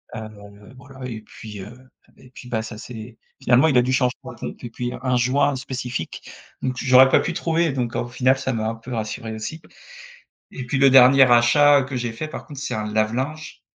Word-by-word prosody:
heu 105 0 -11
voilà 130 -1 -11
et 110 -3 -6
puis, 105 -1 -11
heu 125 +6 -13 0.3
et 130 - -18
puis 125 - -12
bah 115 -2 -2
ça 110 -1 -8
c'est 115 0 -10 0.2
finalement 125 +5 +4
il 135 -5 +2
a - - +6
dû 130 +1 -1
changer 125 -1 +2
la - - -9
pompe - - -8
et 120 - -6
puis 120 +1 -5
un 125 -2 +1
joint 135 +3 +2
spécifique, 125 -8 -6 0.3
donc 130 -1 -2
j'aurais 130 0 +6
pas - - +4
pu 175 - -2
trouver. 165 -1 0
Donc 125 -2 -3
au 120 - -2
final 130 +2 +1
ça 130 - -3
m'a 110 -1 -2
un 115 - -4
peu 120 +2 -9
rassuré 110 0 -4
aussi. 130 +9 -6 0.9
Et 130 - -7
puis 135 - -2
le 135 0 +6
dernier 135 +1 +7
achat, 130 +4 +5
heu, - - -4
que 130 0 -6
j'ai 120 -2 -2
fait 155 +7 -6
par 155 - -8
contre 145 -3 -10
c'est - - -4
un 105 -1 -3
lave-linge, 130 +9 -2
125 Hz, 220 wpm, -22 LUFS, 115-135 Hz, 0.9 s, dernier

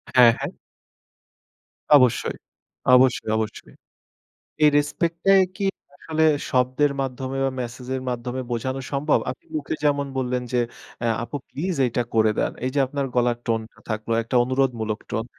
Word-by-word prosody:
হ্যাঁ, 125 -2 +8
হ্যাঁ। - - -3 1.4
অবশ্যই, 125 -4 +3 0.6
অবশ্যই, 125 -3 +3
অবশ্যই, 110 -1 -5 0.9
এই 150 - +8
রেসপেক্টটাই 170 +6 +3
কি 200 - -1 0.3
আসলে 160 +2 -1 0.3
শব্দের 130 +3 +2
মাধ্যমে 130 0 -4
বা 135 - 0
মেসেজের 125 +2 -5
মাধ্যমে 125 +1 -3
বোঝানো 130 +3 -2
সম্ভব? 145 +2 +2
আপনি 130 - -7
মুখে 150 -1 -2
যেমন 140 -1 +2
বললেন 125 -1 -1
যে, 125 - +3 0.5
"এ - - +2 0.2
আপু 145 - -5
প্লিজ 180 +5 -3
এইটা 120 0 0
করে 110 -1 +4
দেন।" - - +1
এই - - +1
যে - - +3
আপনার 140 +1 -2
গলার 120 -1 +2
টোনটা 115 -1 -3
থাকলো 110 +1 -3
একটা 115 +3 -4
অনুরোধমূলক 120 -4 0
টোন। 115 0 -2
130 Hz, 140 wpm, -23 LUFS, 120-140 Hz, 1.4 s, হ্যাঁ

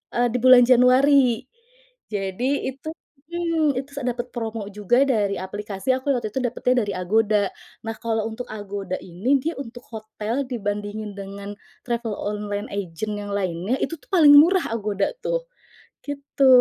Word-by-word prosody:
eee, 245 0 +3
di 250 - 0
bulan 255 0 +8
Januari. 255 0 +5 0.6
Jadi 215 +8 -1
itu, 270 +4 -8 0.4
mmm, 330 -4 +1
itu 275 +1 -8
sa 280 - -5
dapet 245 0 -3
promo 225 -3 -4
juga 210 +6 +2
dari 210 -6 +1
aplikasi 200 +4 -3
aku 260 +2 -1
waktu 220 -4 -3
itu - - -1
dapetnya 250 0 +1
dari - - -2
Agoda. 205 +2 +2 0.3
Nah, 225 0 -4
kalau 225 -2 -1
untuk 245 +3 -7
Agoda 200 -3 -5
ini, 195 +11 0
dia 330 +1 -2
untuk 245 -2 -8
hotel 220 +4 -4
dibandingin 205 -2 -4
dengan 200 +1 -7 0.3
travel 235 -3 -2
online 205 0 -3
agent 200 +2 -4
yang 205 0 -6
lainnya 185 +4 -1
itu 330 - -2
tuh - - -25
paling 310 -6 +7
murah 350 +5 +6
Agoda 210 -3 -1 0.2
tuh, - - -1 0.6
gitu. 280 -1 -1
225 Hz, 150 wpm, -23 LUFS, 205-260 Hz, 0.6 s, bulan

